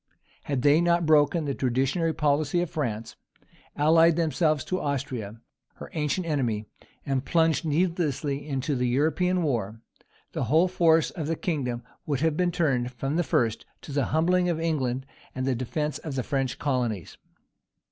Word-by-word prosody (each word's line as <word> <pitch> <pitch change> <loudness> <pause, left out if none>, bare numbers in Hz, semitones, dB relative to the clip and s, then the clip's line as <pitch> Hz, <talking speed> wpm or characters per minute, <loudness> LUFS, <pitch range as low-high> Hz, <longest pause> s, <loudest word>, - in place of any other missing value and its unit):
Had 135 -3 -2
they 150 +3 +5
not 170 0 +2
broken 155 +1 +3
the 140 - -1
traditionary 135 +6 0
policy 150 +1 +1
of 175 -1 -2
France, 115 -8 -3 0.6
allied 165 +2 +5
themselves 155 -2 +1
to 185 - -2
Austria, 125 -7 -3 0.4
her - - -10
ancient 155 +3 -1
enemy, 120 -9 -1 0.4
and 135 -3 -1
plunged 160 -2 +2
needlessly 150 -3 -1
into 135 +1 -1
the 125 0 0
European 165 +8 +1
war, 115 -7 -2 0.5
the - - -2
whole 160 +6 +4
force 165 -3 +3
of 155 -4 -5
the 165 - 0
kingdom 130 -9 -2 0.2
would 145 -3 -1
have 160 -1 +2
been 180 +1 +1
turned, 135 -8 0
from 135 +4 -3
the 175 - +2
first, 115 -5 0 0.2
to - - -9
the 140 -2 +1
humbling 180 +3 +2
of 165 -2 -1
England 135 -6 -1 0.3
and 130 0 -2
the 135 - +1
defence 150 +5 -2
of 150 -4 -6
the 130 - -1
French 135 -2 -1
colonies. 120 - -2
145 Hz, 160 wpm, -26 LUFS, 130-165 Hz, 0.6 s, they